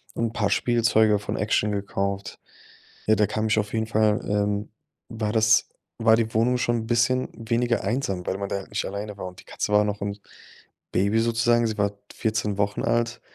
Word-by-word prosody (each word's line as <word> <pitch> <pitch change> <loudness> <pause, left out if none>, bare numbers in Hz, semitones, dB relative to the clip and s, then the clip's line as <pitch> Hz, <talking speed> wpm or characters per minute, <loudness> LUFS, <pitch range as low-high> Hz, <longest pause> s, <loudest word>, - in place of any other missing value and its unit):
'N 115 -1 -1
paar 105 -3 0
Spielzeuge 110 -3 +3
von - - -4
Action 105 0 +1
gekauft. 100 0 -3 0.7
Ja, 110 - +5
da 105 0 +3
kam 110 +1 -1
ich 110 0 +2
auf 105 0 -3
jeden 110 -1 0
Fall, 110 0 +2
ähm 105 0 0 0.4
war 110 -2 -2
das 110 0 +4 0.3
war 110 0 +5
die 115 -1 0
Wohnung 125 +3 +3
schon 120 -1 +1
'n - - -9
bisschen 125 +2 +2
weniger 115 +1 0
einsam, 100 -5 -2
weil 95 - -1
man 100 0 -4
da - - -1
halt 95 - -8
nicht - - -2
alleine 100 +1 -5
war. 95 - -6
Und 90 0 -11
die - - -24
Katze 105 - -3
war 105 0 +5
noch 105 -1 -3
'n 100 0 -3 0.7
Baby 100 +4 +2
sozusagen, 115 +1 +2
sie 110 -1 -3
war 100 0 +1 0.2
14 105 -2 -1
Wochen 100 0 -1
alt. 120 0 0
110 Hz, 200 wpm, -25 LUFS, 100-115 Hz, 0.7 s, Ja